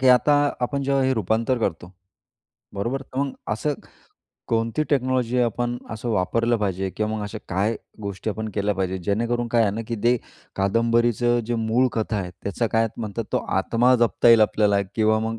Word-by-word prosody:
की 130 - +4
आता 125 +4 +5 0.3
आपण 140 +3 -1
जेव्हा 135 0 +1
हे 130 - +2
रूपांतर 115 +4 0
करतो, 90 -4 -3 0.8
बरोबर? 120 +7 -2
तर 130 0 -8
मग 140 -1 0 0.2
असं 145 +7 -1 0.7
कोणती 115 +5 0
टेक्नॉलॉजी 130 -3 +1
आपण 120 +1 -1
असं 110 +2 -5
वापरली 115 +4 +1
पाहिजे 95 -2 -1
किंवा 110 +4 -2
मग 105 - -4
अशा 105 +1 -5
काय 100 +5 0 0.3
गोष्टी 100 +2 -3
आपण 110 +1 -4
केल्या 105 0 0
पाहिजेत? 95 0 -2
जेणेकरून 120 +3 0
काय 115 0 +3
आहे 105 - +2
ना, 110 - -3
की 115 - -2
ते 120 +1 +5 0.4
कादंबरीचं 115 +3 +2
जे 120 - -1
मूळ 115 +3 +2
कथा 110 -1 -1
आहे, 90 -2 -4
त्याचा 100 +4 -1
काय 115 0 +2
म्हणतात, 110 0 -4
तो - - +3 0.2
आत्मा 125 +2 +3
जपता 120 0 +3
येईल 115 -1 +8
आपल्याला 105 -1 +3
किंवा 110 0 +3
मग 115 +1 -3
115 Hz, 180 wpm, -23 LUFS, 105-120 Hz, 0.8 s, येईल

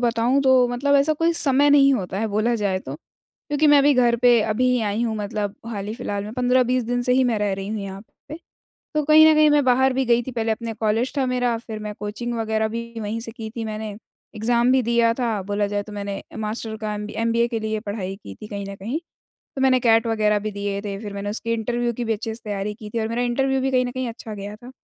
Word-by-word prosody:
बताऊँ 240 +3 +2
तो 260 -2 +5
मतलब 275 +4 +1
ऐसा 285 +3 +3
कोई 330 +2 +1
समय 285 -2 +3
नहीं 275 -1 +6
होता 190 -4 -3
है 225 - 0
बोला 215 +3 +1
जाए 200 -4 0
तो, 135 -6 -8
क्योंकि 295 - -4
मैं 290 -1 +7
अभी 290 +1 +5
घर 240 -2 +3
पे 240 -1 +5
अभी 220 +4 +1
ही 250 -1 +2
आई 210 +2 -1
हूँ 225 -2 -1
मतलब 210 -1 -3
हाल 205 -4 -5
ही 215 - -4
फिलहाल 205 -4 -4
में, 210 - -7
15-20 250 0 +2
दिन 245 +1 -1
से 250 - +1
ही 260 0 +4
मैं 235 -3 +1
रह 205 -1 0
रही 195 +1 -6
हूँ 215 -1 -3
यहाँ 195 0 -7 0.3
पे। 305 - -6 0.6
तो 305 - +2
कहीं 310 +1 +7
न - - +5
कहीं 305 0 +5
मैं 295 -1 +4
बाहर 260 +1 +3
भी 265 +1 0
गई 240 -1 +3
थी, 260 - -6
पहले 225 -2 -1
अपने 230 +1 -4
कॉलेज 225 +4 0
था 270 - +2
मेरा, 245 -2 0
फिर 225 -2 -7
मैं 210 0 -5
कोचिंग 215 +4 -4
वग़ैरह 220 -1 0
भी 235 +1 -6
वहीं 215 +2 -3
से 225 0 -5
की 220 -1 -7
थी 230 0 -5
मैंने 215 0 -4 0.5
एग्ज़ाम 235 +3 +2
भी 260 -1 +3
दिया 235 0 +3
था। 230 -5 -1
बोला 205 +1 -1
जाए 205 0 -2
तो 210 - -12
मैंने 200 -1 -5 0.2
मास्टर 220 +1 -4
का 215 -1 -3
एमबी 210 0 -6
एमबीए 230 +1 +2
के 230 -2 -3
लिए 220 0 -2
पढ़ाई 200 -2 -4
की 100 - -8
थी 215 - -10
कहीं 200 -1 -5
न 200 - -6
कहीं, 225 +10 -4 0.6
तो - - -3
मैंने 255 -1 +4
कैट 225 -1 +4
वग़ैरह 215 -2 +2
भी 215 +1 -4
दिए 200 0 -3
थे 200 -2 -4
फिर 210 -2 -7
मैंने 200 +1 -4
उसकी 230 +2 -3
इंटरव्यू 240 +1 -1
की 240 +1 -4
भी 225 - 0
अच्छे 220 +1 -4
से 235 - -8
तैयारी 205 0 -3
की 210 -2 -10
थी 230 - 0
और 220 - -1
मेरा 235 +2 -1
इंटरव्यू 265 +2 +1
भी 265 +1 0
कहीं 255 -1 +2
न 245 - -3
कहीं 255 -1 -3
अच्छा 225 -1 -8
गया 205 +1 -7
था। 245 +3 -12
230 Hz, 260 wpm, -22 LUFS, 210-250 Hz, 0.6 s, मैं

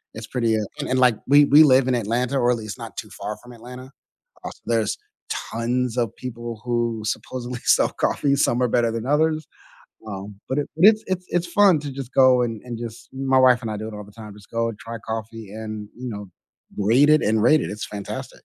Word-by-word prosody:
It's 110 -1 -7
pretty, 115 -3 0
uh 105 - -1 0.2
and - - -3
and, 130 0 +1
like, 125 -4 +4
we 145 +1 +7
we 150 +3 +7
live 130 -2 +5
in 125 - +2
Atlanta, 120 +4 0
or 120 0 +2
at 120 - +1
least 110 +1 -7
not 115 -1 -8
too 105 - -6
far 105 +1 -6
from 125 - -13
Atlanta, 125 +3 -11 0.5
als - - -8
there's 115 -3 0 0.6
tons 120 +1 -1
of 115 -3 -1
people 120 -3 -7
who 120 -2 -1
supposedly 125 +3 -4
sell - - +4
coffees, 145 - -1
and 140 - +2
some 125 -3 +2
are - - +3
better 115 -1 +2
than 115 0 -4
others, 155 +1 +1 0.6
um, 100 0 -7
but 130 - -1
it 145 - -2
but 180 - +6
it's 220 0 +3
it's 185 -1 -2
it's 175 0 0
fun 195 -3 +5
to 145 -1 -6
just 135 -1 -7
go 130 -2 +5
and 115 -3 -3
and 120 -2 -6
just 115 0 -8
my 135 0 +2
wife 125 -1 +5
and 110 - -4
I - - -3
do 110 +1 -5
it 110 - -8
all 105 0 -7
the 105 - -16
time, 105 -2 -11
just 105 0 -17
go 115 0 0
and 105 - -11
try 115 0 -7
coffee 110 -1 -6
and, 110 -1 -6
you 125 +1 -6
know, 105 -2 -7 0.5
rate 120 +9 +4
it 155 - +5
and 110 0 +2
rate 150 +7 +5
it, - - -4
it's 105 0 -5
fantastic. 100 -1 -6
120 Hz, 235 wpm, -23 LUFS, 110-130 Hz, 0.6 s, we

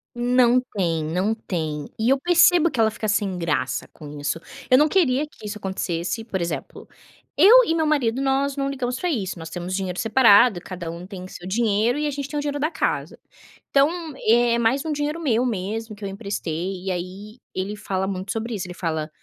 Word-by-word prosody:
Não 245 0 +4 0.2
tem, 165 -5 0
não 180 +7 0
tem. 155 -8 -4
E 225 +3 +2
eu 270 - +4
percebo 340 +1 +5
que 245 - -5
ela 220 -1 +5
fica 215 0 -4
sem 200 -3 0
graça 130 -6 -1
com 150 -1 -10
isso, 145 +3 -2 0.3
eu 255 - +7
não 300 +3 +5
queria 295 -6 +2
que 220 - -15
isso 210 +1 -5
acontecesse 190 +1 -3
por 195 -5 -3
exemplo, 170 - -5 0.5
eu - - +8
e 325 - 0
meu 320 -1 +1
marido 270 -5 +1
nós 275 +1 +1
não 275 0 0
ligamos 255 -2 -3
para 360 - -1
isso, 195 - -3
nós 160 0 -8
temos 175 +2 -4
dinheiro 185 -2 -3
separado, 225 -3 +5
cada 175 -2 -7
um 170 +2 -7
tem 190 -1 -8
o - - -8
seu 175 - -9
dinheiro 220 +3 +1
e 300 - 0
a - - -1
gente 280 -1 -4
tem 295 +1 -5
o - - 0
dinheiro 290 0 -3
da 310 +3 0
casa, - - -2 0.5
então 275 +1 +4 0.4
é 235 +1 +4
mais 250 +6 +1
um 315 - -2
dinheiro 295 +2 -2
meu 250 -5 +1
mesmo 220 0 -3
que 205 - -13
eu 195 - -3
emprestei 190 -3 -4
e 190 - -1
aí 190 +6 -6 0.2
ele 190 +3 -3
fala 190 -2 -2
muito 190 0 -4
sobre 230 +1 -3
isso, 195 -4 -4
ele 180 - -7
fala: 160 -3 -2
215 Hz, 210 wpm, -23 LUFS, 185-265 Hz, 0.5 s, eu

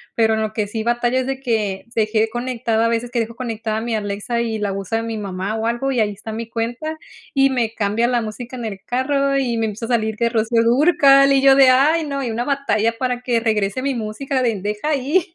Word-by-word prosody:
Pero 220 -1 +3
en 220 - -1
lo 215 0 -2
que 210 -2 -1
sí 220 +2 -4
batallo 240 +2 +1
es 260 - -1
de 270 0 -3
que 215 -7 -2
se 220 -2 +1
quede 220 0 +1
conectada, 235 -2 -1
a - - +2
veces 230 +1 -1
que 240 - 0
dejo 230 0 -3
conectada 225 -3 -3
mi 235 -1 -2
Alexa 210 +3 -2
y 225 -2 -2
la 205 -1 -1
usa 195 +3 -2
mi 230 -1 -4
mamá 195 0 -4
o 225 0 -2
algo, 240 +4 -1
y 255 - 0
ahí 210 -2 +2
está 220 +2 -8
mi 225 +1 -5
cuenta, 240 +8 -3 0.4
y 275 -1 +4
me 235 -4 -1
cambia 215 +2 0
la 245 -1 +1
música 235 +3 -7
en 235 - -5
el 195 -3 -5
carro 275 +2 0
y 245 -4 0
me 225 - 0
empieza 215 +2 -5
a - - -6
salir 220 -3 0
que 235 +1 +1
Rocío 230 0 +1
Dúrcal 275 +2 +5
y 270 - +3
yo 270 0 +6
de: 270 -1 +7
"Ay, 305 +6 +3
no" 280 -1 -3
y 245 - -2
una 230 +2 -2
batalla 250 -5 +1
para 250 -1 -1
que 245 -2 +1
regrese 215 +1 0
mi 275 -1 -1
música 250 +4 -2
de: 225 -5 0
"Deja 210 +8 -3
ahí". 310 +5 0
235 Hz, 245 wpm, -20 LUFS, 220-260 Hz, 0.4 s, de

